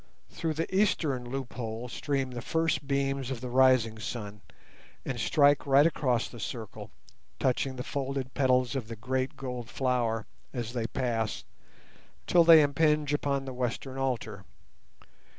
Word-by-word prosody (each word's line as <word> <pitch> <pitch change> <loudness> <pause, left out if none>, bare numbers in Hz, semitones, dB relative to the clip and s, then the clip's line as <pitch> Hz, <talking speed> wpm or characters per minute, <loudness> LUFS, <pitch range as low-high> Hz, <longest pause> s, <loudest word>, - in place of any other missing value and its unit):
Through 160 -2 -2
the 165 +4 -3
eastern 145 -11 +1
loophole 120 -3 -5
stream 135 +1 -2
the 120 -1 -5
first 160 -1 0
beams 135 -1 0
of 130 -3 -3
the 125 0 -6
rising 130 -4 +4
sun, 105 -3 -6 0.6
and 125 -3 -3
strike 145 +3 +3
right 140 +2 +6
across 125 -7 +1
the 120 - -11
circle, 110 +1 -6 0.5
touching 130 +1 0
the 125 - -4
folded 135 -2 -3
petals 130 -2 +2
of 125 -5 -3
the 115 - -6
great 130 +3 -2
gold 125 -3 -5
flower 120 -4 0 0.3
as 120 -3 -4
they 115 -2 -1
pass 115 -4 -2 0.8
till 175 -1 +5
they 165 -2 +8
impinge 150 0 +2
upon 140 -2 0
the 130 - -6
western 125 +2 -3
altar. 120 -7 -2
130 Hz, 145 wpm, -29 LUFS, 120-140 Hz, 0.8 s, they